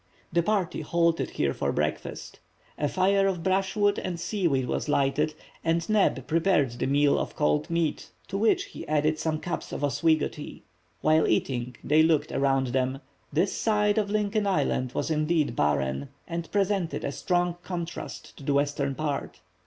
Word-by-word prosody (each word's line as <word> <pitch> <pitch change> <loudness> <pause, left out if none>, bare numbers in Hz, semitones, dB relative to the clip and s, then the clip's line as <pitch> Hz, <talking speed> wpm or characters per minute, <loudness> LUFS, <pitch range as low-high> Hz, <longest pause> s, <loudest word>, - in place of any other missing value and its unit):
The 170 - +4
party 190 -2 0
halted 170 +1 +1
here 70 -2 0
for - - -1
breakfast; 75 +1 -3 0.4
a 150 - 0
fire 195 +1 +3
of 180 -4 -2
brushwood 195 +2 +1
and 175 -2 -4
seaweed 170 - 0
was 150 - -2
lighted, 145 +2 +1 0.3
and 165 0 +1
Neb 200 - +2
prepared 165 -5 +2
the 120 - -3
meal 145 +1 +3
of - - -4
cold 75 0 +1
meat, 170 -2 -1 0.2
to - - -6
which 225 - +3
he 400 - -9
added 155 +1 +1
some 155 -1 -1
cups 175 +1 -4
of - - -4
Oswego 155 +2 +2
tea. 150 - -10 0.4
While 155 +1 +4
eating 125 -2 0
they 155 +2 +4
looked 155 -2 +2
around 135 -1 +1
them. 130 +1 0 0.3
This 170 +6 +1
side 210 -1 +2
of 205 -2 -1
Lincoln 210 0 0
island 130 -9 0
was - - -1
indeed 155 -4 +1
barren, 70 - 0 0.2
and 170 -1 -5
presented 195 -4 0
a - - -1
strong 175 +3 0
contrast 175 -2 -6
to - - -11
the 140 +1 +1
western 140 -1 0
part. 150 -1 -3
160 Hz, 165 wpm, -27 LUFS, 140-185 Hz, 0.4 s, The